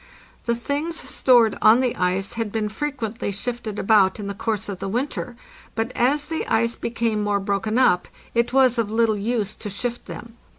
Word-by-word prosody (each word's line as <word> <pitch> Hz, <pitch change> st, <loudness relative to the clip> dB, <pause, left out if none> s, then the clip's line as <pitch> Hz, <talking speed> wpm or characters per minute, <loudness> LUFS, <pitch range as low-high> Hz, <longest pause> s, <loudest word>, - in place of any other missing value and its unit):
The 235 Hz, -, +1 dB
things 290 Hz, +7 st, -2 dB
stored 240 Hz, -4 st, +3 dB
on 220 Hz, +3 st, +7 dB
the 255 Hz, -2 st, 0 dB
ice 185 Hz, +2 st, 0 dB
had 230 Hz, -3 st, -3 dB
been 215 Hz, -1 st, -1 dB
frequently 235 Hz, -4 st, -3 dB
shifted 220 Hz, +1 st, -4 dB
about 200 Hz, -2 st, +3 dB
in 205 Hz, -, -5 dB
the 200 Hz, -, -3 dB
course 215 Hz, 0 st, -2 dB
of 195 Hz, -3 st, -5 dB
the -, -, -4 dB
winter, 245 Hz, +1 st, -3 dB, 0.4 s
but 225 Hz, +2 st, -1 dB
as 285 Hz, +4 st, +2 dB
the 320 Hz, -, -3 dB
ice 230 Hz, +1 st, +1 dB
became 230 Hz, -2 st, -1 dB
more 205 Hz, -1 st, +1 dB
broken 200 Hz, +3 st, -1 dB
up, 180 Hz, -9 st, +3 dB, 0.3 s
it 235 Hz, 0 st, +1 dB
was 255 Hz, -2 st, +4 dB
of 220 Hz, -3 st, 0 dB
little 225 Hz, 0 st, +2 dB
use 215 Hz, 0 st, -1 dB
to 210 Hz, -, -7 dB
shift 240 Hz, +4 st, -4 dB
them. 235 Hz, 0 st, -9 dB
225 Hz, 185 wpm, -23 LUFS, 205-245 Hz, 0.4 s, on